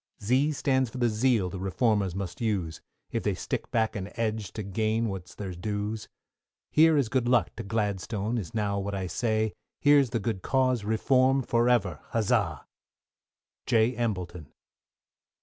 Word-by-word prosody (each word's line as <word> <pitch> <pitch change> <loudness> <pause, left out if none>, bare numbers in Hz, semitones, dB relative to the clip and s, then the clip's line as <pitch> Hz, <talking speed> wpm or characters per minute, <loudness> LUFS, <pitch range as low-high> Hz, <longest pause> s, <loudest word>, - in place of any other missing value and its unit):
=Z= 130 +8 +2
stands 130 -3 +1
for 130 - -9
the 120 -1 +2
Zeal 110 -4 +2
the 95 - -5
Reformers 95 -1 +1
must 95 -1 -5
use, 95 -8 -1 0.3
If - - -1
they - - 0
stick - - -4
back 110 -1 0
and 100 0 -5
edge 110 -4 -2
to 110 - -4
gain 110 +3 0
what's 95 -3 -7
their 95 -3 -5
dues. 105 +4 -3 0.6
Here 160 0 +5
is 140 -5 +2
good 125 +1 0
luck 120 -2 +2
to - - -3
Gladstone, 105 +1 -1
is 95 0 -7
now 100 -2 0
what 100 +1 -3
I 95 -1 -2
say, 110 +4 0 0.3
Here's 145 -3 +5
the 115 - -1
good 100 -2 -2
cause 130 -2 +1
Reform, 130 +5 +3
for 120 +1 +2
ever, 100 - +1
huzza! 110 -3 +1 1.0
J. 115 +2 +3
EMBLETON. 90 - -3
110 Hz, 160 wpm, -28 LUFS, 100-120 Hz, 1.0 s, Here